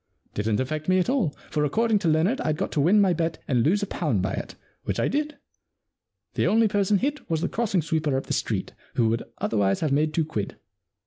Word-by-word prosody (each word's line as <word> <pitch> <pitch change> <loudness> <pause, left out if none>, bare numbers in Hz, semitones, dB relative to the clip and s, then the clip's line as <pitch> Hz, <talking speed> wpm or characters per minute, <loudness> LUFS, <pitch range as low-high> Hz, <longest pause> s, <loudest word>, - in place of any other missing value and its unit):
Didn't 105 +1 0
affect 155 +5 -2
me 185 - +4
at 185 +6 +1
all, 220 - 0 0.2
for 150 - +1
according 220 +8 +2
to 175 - -1
Leonard 160 +10 +2
Fd 155 - 0
got 190 +5 -3
to 145 - +1
win 185 +8 +5
my 195 -3 +4
bet 165 0 -1
and 125 -4 +2
lose 190 - +2
a - - +1
pound 145 - -1
by 95 - -1
it, - - -5 0.3
which - - -2
I - - +2
did. 300 +1 -2 1.0
The - - +1
only 225 +1 +4
person 205 -1 +2
hit 290 +6 -3
was 160 -1 0
the 180 - +1
crossing 200 -7 0
sweeper 155 -3 0
up 135 - -3
the - - -3
street, - - -2 0.2
who 115 -2 +3
would 115 +1 0 0.2
otherwise 100 -3 0
have 155 -3 0
made 150 +2 +2
two 160 0 0
quid. 110 -10 -4
160 Hz, 230 wpm, -25 LUFS, 140-205 Hz, 1.0 s, win